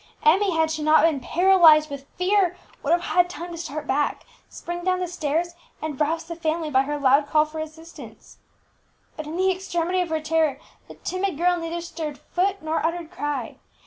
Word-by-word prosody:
Emmie, 370 +3 +4
had 320 0 +2
she 315 -1 -3
not 310 +1 +5
been 320 -4 +3
paralyzed 325 0 +5
with 280 -1 -8
fear, 365 -1 +2 0.2
would 295 - -1
have 345 +1 +3
had 355 0 +2
time 345 +1 -7
to 335 - -7
start 310 -2 -5
back, 285 +1 -1 0.2
spring 345 0 -6
down 370 0 +1
the 365 - -2
stairs, 335 0 -2 0.3
and 310 -2 -5
rouse 320 +2 0
the 335 - -7
family 320 -1 -2
by 265 -1 +4
her 295 +2 -3
loud 280 +1 +3
call 305 +1 +3
for 310 +1 -8
assistance. 320 +2 -10 0.8
But 310 -1 -7
in 320 +3 -5
the 380 +1 +3
extremity 365 -1 -1
of 355 - -3
her 320 0 0
terror 310 -2 +1 0.3
the - - -12
timid 370 -3 -3
girl 355 +2 +3
neither 340 0 -4
stirred 315 -4 -6
foot 385 0 -2
nor 315 +1 -1
uttered 335 0 -2
cry. 290 -8 -4
325 Hz, 195 wpm, -24 LUFS, 305-355 Hz, 0.8 s, not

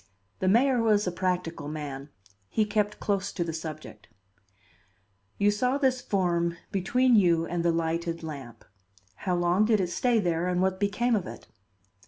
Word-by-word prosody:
The 190 - 0
mayor 245 +5 +4
was 210 -2 +3
a 180 - -1
practical 175 -4 -2
man; 145 -2 -6 0.4
he 220 - +1
kept 210 0 -1
close 200 -1 -1
to 175 - -1
the 165 -1 -4
subject. 155 -8 -8 1.3
"You 205 +1 +3
saw 250 +6 0
this 260 -3 +1
form 170 -4 0
between 245 +6 +2
you 170 -5 +4
and 170 0 -2
the 170 - +3
lighted 165 0 -2
lamp. 135 -7 -8 0.5
How 180 - -1
long 175 +4 +2
did 215 -1 +3
it 180 -2 -1
stay 245 +5 +2
there 175 -4 0
and 180 0 0
what 190 0 +1
became 225 +4 +1
of 200 - -2
it?" - - -9
180 Hz, 165 wpm, -27 LUFS, 170-210 Hz, 1.3 s, mayor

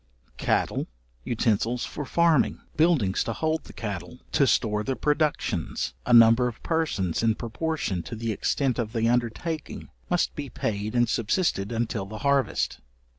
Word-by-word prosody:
Cattle, - - 0 0.4
utensils 115 - 0
for 145 - -6
farming, 170 -1 +3 0.2
buildings 155 - +3
to - - -2
hold 160 -1 -1
the - - -11
cattle, 100 0 -6
to 140 - +3
store 105 -4 +2
the 135 +4 -1
productions, 150 +1 -1
a - - +1
number 115 +1 +7
of 120 - -7
persons, 155 - 0
in 115 -1 +2
proportion 115 - -2
to 115 - -7
the 115 0 -2
extent 130 +4 0
of 110 -2 -2
the 115 -1 +1
undertaking, 125 +7 -2 0.2
must 175 -1 +1
be 145 -2 -6
paid 105 0 -3
and 120 0 +4
subsisted 115 - 0
until 115 -4 -2
the 110 +2 -7
harvest. 140 -1 +1
120 Hz, 150 wpm, -26 LUFS, 110-150 Hz, 0.4 s, number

